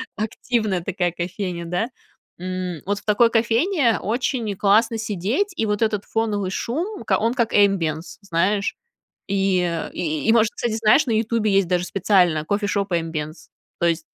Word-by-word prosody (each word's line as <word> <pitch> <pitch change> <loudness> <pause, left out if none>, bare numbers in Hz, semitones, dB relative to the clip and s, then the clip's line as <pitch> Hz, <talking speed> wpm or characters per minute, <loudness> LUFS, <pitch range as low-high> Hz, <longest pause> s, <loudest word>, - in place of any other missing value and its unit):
активная 215 -3 -1
такая 180 -1 -1
кофейня, 175 0 -4
да. 180 +7 -1 0.5
М, 180 -3 -4
вот 200 +1 -1
в - - -23
такой 220 +2 +4
кофейне 235 - +2
очень 230 0 -1
классно 210 +3 +3
сидеть, 220 - -1
и 225 - +1
вот 210 0 -1
этот 215 -3 0
фоновый 210 -4 -1
шум, 345 - -3
к - - +2
он 230 +2 +1
как 235 -3 0
ambiance 175 -6 +1
знаешь. 200 +2 0 0.5
И, 195 -1 +1
э, 170 -2 -2
и, 155 +5 0
может, 225 -2 +4
кстати, 235 -2 -2
знаешь, 220 +6 +4
на 245 - -2
"Ютубе" 220 -1 +1
есть 195 -2 +3
даже 180 0 0
специально 185 -4 +2
Coffee 205 +7 -1
Shop 200 -1 0
Ambience. 160 -2 -3 0.3
То - - +1
есть 165 -1 -1
200 Hz, 160 wpm, -22 LUFS, 180-225 Hz, 0.5 s, такой